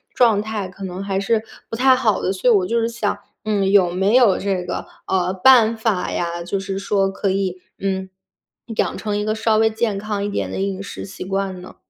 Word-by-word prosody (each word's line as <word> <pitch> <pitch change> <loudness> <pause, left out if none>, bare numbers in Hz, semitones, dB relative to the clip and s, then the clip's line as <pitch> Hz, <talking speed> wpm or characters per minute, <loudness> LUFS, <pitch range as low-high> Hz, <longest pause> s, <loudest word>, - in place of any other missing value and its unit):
状 225 -5 +4
态 215 -2 -4
可 190 +2 -11
能 185 0 -5
还 195 -1 -1
是 220 +2 +1 0.3
不 - - -4
太 260 +2 +5
好 230 -5 +1
的， 185 - +1
所 195 +6 +1
以 235 - +6
我 190 -3 +3
就 235 +4 +1
是 230 - +1
想， 230 -4 -2 0.3
嗯， 200 -2 +1
有 190 -4 +5
没 190 +4 +1
有 235 -7 +5
这 190 -2 -1
个， - - -4 0.2
呃， 185 -1 +1
办 230 +3 +5
法 220 -4 -1
呀， 170 0 -2
就 190 +3 -2
是 195 0 -4
说 195 0 +1
可 195 0 -1
以， 190 -2 -1 0.2
嗯， 190 -1 -2 0.7
养 - - 0
成 210 -1 -2
一 210 - -2
个 215 - 0
稍 220 0 +1
微 220 0 +4
健 220 -2 -1
康 205 0 -3
一 205 - -1
点 200 - -3
的 - - -4
饮 195 0 -2
食 - - -7
习 195 - -8
惯 195 -1 -2
呢？ 180 - -12
200 Hz, 240 characters per minute, -21 LUFS, 190-220 Hz, 0.7 s, 以